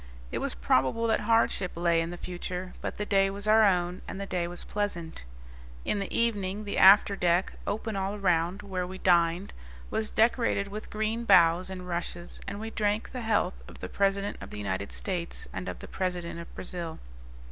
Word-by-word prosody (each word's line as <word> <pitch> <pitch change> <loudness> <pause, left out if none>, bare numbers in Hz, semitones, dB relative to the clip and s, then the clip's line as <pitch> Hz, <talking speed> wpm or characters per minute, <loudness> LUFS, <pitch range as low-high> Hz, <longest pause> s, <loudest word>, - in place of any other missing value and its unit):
It - - -2
was - - -2
probable 130 - +2
that 225 - +2
hardship 225 -4 +2
lay 170 -1 +2
in 165 - -2
the 175 - -6
future; 180 +1 -5
but - - -4
the 210 - -2
day 195 -1 +3
was 200 +2 -4
our 220 +1 +6
own, 180 -3 +2
and - - -6
the 200 - -3
day 180 -3 -1
was 175 0 -6
pleasant. 180 - -3 0.6
In 205 - 0
the 195 - -4
evening 205 -3 0
the 205 - -2
after 200 +1 +8
deck, 175 0 +2
open 220 +1 -2
all 195 +1 -1
around, 180 0 +1
where 185 -2 -3
we 190 +1 -7
dined, 175 +1 +2 0.4
was 220 -1 -1
decorated 225 -3 +2
with 210 +2 -7
green 220 +2 -1
boughs 180 -3 +5
and 185 -1 -7
rushes, 175 0 -4
and 200 - -4
we 220 +1 -5
drank 210 0 0
the 255 - -5
health 210 -5 0
of - - -12
the - - -6
President 200 0 0
of - - -8
the - - -8
United 100 -1 -3
States 175 -3 -4
and 95 -1 -4
of 90 - -5
the - - -10
President 180 -2 -3
of 170 - -9
Brazil. 170 -3 -6
190 Hz, 195 wpm, -29 LUFS, 175-205 Hz, 0.6 s, after